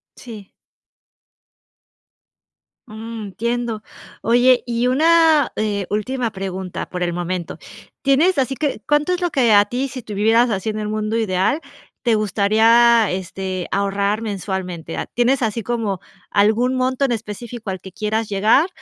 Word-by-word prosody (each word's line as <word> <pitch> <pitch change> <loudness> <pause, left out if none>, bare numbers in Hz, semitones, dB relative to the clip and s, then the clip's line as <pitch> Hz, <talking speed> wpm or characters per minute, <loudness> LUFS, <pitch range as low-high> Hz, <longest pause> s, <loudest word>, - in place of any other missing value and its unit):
Sí. 215 -5 -11 2.4
Mm, 225 +1 -7
entiendo, 235 +2 -3 0.4
oye, 245 +2 +4
y 240 0 0
una, 315 +2 +4
eh, 205 -2 -1
última 230 +3 -2
pregunta 190 -2 -5
por 180 -1 -3
el 175 -1 -1
momento, 175 0 -4 0.4
¿tienes 295 +7 +3
así 270 0 0
que, 285 -5 -2
cuánto 295 +4 +2
es 360 - -3
lo 350 - +1
que 260 -8 +3
a 205 0 +6
ti, 250 +6 -2
si 255 -1 -7
tú 215 - -8
vivieras 225 +4 +3
así 200 0 -2
en 215 0 -3
el 210 - -3
mundo 215 +1 -2
ideal, 215 - 0 0.4
te 235 -3 +2
gustaría, 220 +2 +4
este, 185 0 -4
ahorrar 200 +2 0
mensualmente? 190 -5 -4 0.2
¿Tienes 250 +2 +2
así 225 +1 -1
como 220 -4 -2 0.3
algún 220 +5 +3
monto 255 +1 +1
en 265 - -1
específico 225 0 -6
al 190 -1 -4
que 190 - -10
quieras 215 +3 -2
llegar?, 215 - +3
220 Hz, 145 wpm, -20 LUFS, 200-245 Hz, 2.4 s, a